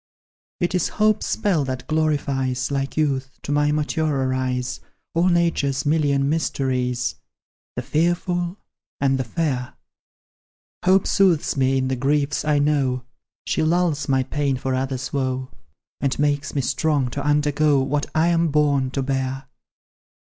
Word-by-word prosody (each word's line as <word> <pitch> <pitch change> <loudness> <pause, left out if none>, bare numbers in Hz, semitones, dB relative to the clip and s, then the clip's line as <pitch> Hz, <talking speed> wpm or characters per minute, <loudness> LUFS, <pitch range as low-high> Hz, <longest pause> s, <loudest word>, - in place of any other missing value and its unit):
"It 175 -1 0
is 180 -3 +1
hope's 215 0 +2
spell 180 -8 +1
that 130 -1 -4
glorifies, 140 -5 0
Like 135 +1 -2
youth, 135 -3 -1
to - - -4
my 145 0 +2
maturer 150 -3 0
eyes, 130 -1 -2 0.3
All 170 +2 +2
Nature's 170 -6 +1
million 145 -2 +2
mysteries, 130 -5 -1 0.6
The - - -3
fearful 175 +2 0 0.4
and 135 -1 +2
the - - +1
fair 130 -1 -2 1.1
Hope 190 +1 +4
soothes 185 -6 +2
me 135 -1 +2
in 130 0 0
the 130 - 0
griefs 140 +3 0
I 150 -1 +2
know; 140 -3 +1 0.4
She - - 0
lulls 160 -3 +1
my 130 -1 +3
pain 140 0 -1
for 130 0 -2
others' 130 0 -3
woe, 130 -1 -2 0.5
And 140 -2 0
makes 145 0 0
me 140 - +2
strong 135 +1 0
to 140 +3 -4
undergo 150 0 +2
What 145 +2 -1
I 160 +2 +3
am 170 -1 +2
born 145 -3 +2
to 135 - +1
bear. 135 0 -2
140 Hz, 140 wpm, -22 LUFS, 130-155 Hz, 1.1 s, Hope